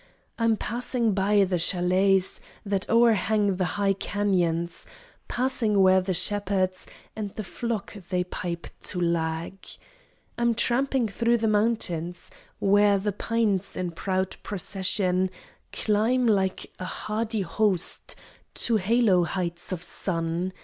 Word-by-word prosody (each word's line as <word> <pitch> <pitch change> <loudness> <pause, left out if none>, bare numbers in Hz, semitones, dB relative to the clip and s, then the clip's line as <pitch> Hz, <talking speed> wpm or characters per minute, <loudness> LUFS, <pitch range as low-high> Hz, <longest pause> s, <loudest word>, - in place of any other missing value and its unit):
I'm 230 -1 +3
passing 235 -1 0
by 200 +1 +3
the 180 -2 0
chalets 185 +2 +2 0.2
That 195 -1 -1
o'erhang 215 -3 +3
the 185 - +1
high 200 -1 +2
cañons, 175 -4 -1 0.4
Passing 240 -5 +1
where 190 0 +6
the 185 0 -2
shepherds 185 0 -1 0.3
And 210 -3 -5
the 215 - -4
flocks 205 -2 -5
they 180 -1 +1
pipe 170 -2 -5
to 180 - -2
lag. 165 0 -1 0.9
I'm 235 -1 +2
tramping 255 +1 +1
thro 235 +3 +1
the 225 -1 0
mountains 205 -6 0 0.3
Where 205 0 +4
the 205 +2 -1
pines 205 -2 -1
in 180 -1 -2
proud 190 +2 -2
procession 190 -1 0 0.4
Climb 225 +4 +1
like 195 -4 0
a 185 - -4
hardy 215 +3 -2
host 190 0 0 0.4
To 230 - +2
halo 205 -2 +3
heights 175 0 -3
of 180 -2 -3
sun. 170 0 -2
195 Hz, 120 wpm, -26 LUFS, 180-220 Hz, 0.9 s, where